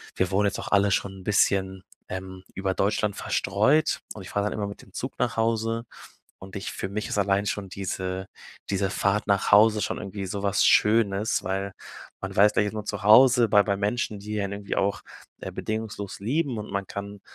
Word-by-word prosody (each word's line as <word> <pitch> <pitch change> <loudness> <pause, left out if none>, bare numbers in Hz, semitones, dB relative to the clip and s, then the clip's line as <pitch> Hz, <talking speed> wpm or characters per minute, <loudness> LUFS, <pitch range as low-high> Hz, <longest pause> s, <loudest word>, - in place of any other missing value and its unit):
wir 95 -1 +1
wohnen 100 +2 +2
jetzt 100 - -3
auch - - -6
alle 100 0 +3
schon 95 +1 0
'n - - -14
bisschen, 95 -2 +1 0.3
ähm, 95 0 -7
über 95 -1 -1
Deutschland 105 0 0
verstreut 130 +11 +1
und 100 - -8
ich - - -10
fahre 100 0 0
dann - - -1
immer 105 -2 -3
mit 100 - -9
dem 95 - -20
Zug 130 - -5
nach 120 -2 0
Hause 115 +1 0 0.5
und 95 0 -11
ich 95 - -4
für 95 - -4
mich 105 +2 -4
ist - - -2
allein 100 0 +1
schon 100 -2 -3
diese 95 -1 -4 0.4
diese 100 0 0
Fahrt 100 +2 0
nach 100 -1 +1
Hause 105 +1 +6
schon - - -2
irgendwie 100 -1 -5
so 100 +2 -4
was 100 0 +2
Schönes, 105 0 +3
weil 95 +1 -2 0.5
man - - -5
weiß, 105 +2 +6
gleich 105 - +2
ist 105 - -4
man 105 -1 -4
zu 100 - -4
Hause, 120 +2 +7
bei 105 0 +6
bei 100 -1 0
Menschen, 105 +1 -1
die 105 0 -4
einen 100 0 -3
irgendwie 100 0 -4
auch, 100 +1 0 0.4
äh, - - -5
bedingungslos 110 -2 -4
lieben 130 +2 -1
und 105 - -6
man 100 -1 -3
kann 100 0 -7
100 Hz, 210 wpm, -26 LUFS, 95-105 Hz, 0.5 s, Hause